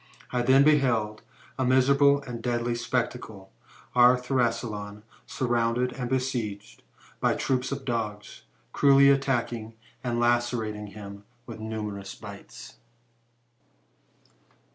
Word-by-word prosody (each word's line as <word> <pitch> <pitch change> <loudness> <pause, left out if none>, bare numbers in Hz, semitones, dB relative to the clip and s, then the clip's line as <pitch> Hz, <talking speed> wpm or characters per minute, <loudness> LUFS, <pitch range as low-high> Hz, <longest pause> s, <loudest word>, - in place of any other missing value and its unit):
I 125 - 0
then 130 +3 +5
beheld 125 -8 +2 0.4
a - - +2
miserable 140 +2 +4
and 120 -3 -7
deadly 120 0 -1
spectacle, 120 -4 -3 0.4
our 125 +1 +6
Thrasyleon 115 -5 -2 0.2
surrounded 120 0 0
and 125 -3 -4
besieged 120 -6 -3 0.4
by - - +2
troops 130 0 -1
of 140 -1 -5
dogs, 105 -4 -4 0.3
cruelly 140 0 +6
attacking 120 -5 -1 0.3
and 120 -2 -1
lacerating 120 -3 0
him 100 -1 -10 0.2
with 115 -2 -9
numerous 105 -3 -5
bites. - - -11
120 Hz, 100 wpm, -27 LUFS, 110-130 Hz, 0.4 s, our